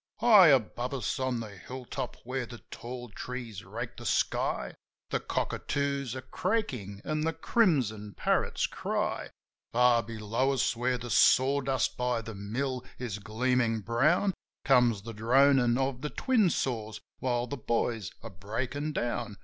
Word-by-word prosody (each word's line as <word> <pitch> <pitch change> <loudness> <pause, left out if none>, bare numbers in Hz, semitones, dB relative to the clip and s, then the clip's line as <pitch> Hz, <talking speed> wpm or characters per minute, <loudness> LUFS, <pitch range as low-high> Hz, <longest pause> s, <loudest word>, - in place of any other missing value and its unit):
High 210 -7 +8
above 130 -1 +2
us, 130 +2 -2
on 130 -3 -1
the 110 -2 -7
hill 125 +8 -8
top, 130 0 -5
where 130 0 -3
the 120 -1 -11
tall 120 0 -7
trees 115 -1 -6
rake - - -6
the - - -9
sky, - - 0 0.4
The - - +1
cockatoos 140 -3 -2
are 130 - -6
craaking 130 - -2
and 155 0 -1
the 165 +1 0
crimson 120 - +1
parrots - - +1
cry. - - -2 0.4
From 120 -1 +4
below 115 +4 0
us, 125 -2 +1
where 125 +2 0
the 120 -1 -7
sawdust 135 +3 +3
by 125 -2 0
the 115 0 -7
mill 125 +6 -3
is 115 -5 -4
gleamin' 115 +1 0
brown. 150 - +2 0.3
Comes 120 -6 +4
the 115 +1 -7
dronin' 125 +2 +4
of 135 -1 -1
the 150 - -2
twin 230 - +2
saws 110 -8 -2 0.2
while 120 -2 0
the 125 - -5
boys 115 -4 -1
are 115 - -7
breakin' 125 - -3
down. 120 -4 -2
125 Hz, 150 wpm, -29 LUFS, 115-135 Hz, 0.4 s, High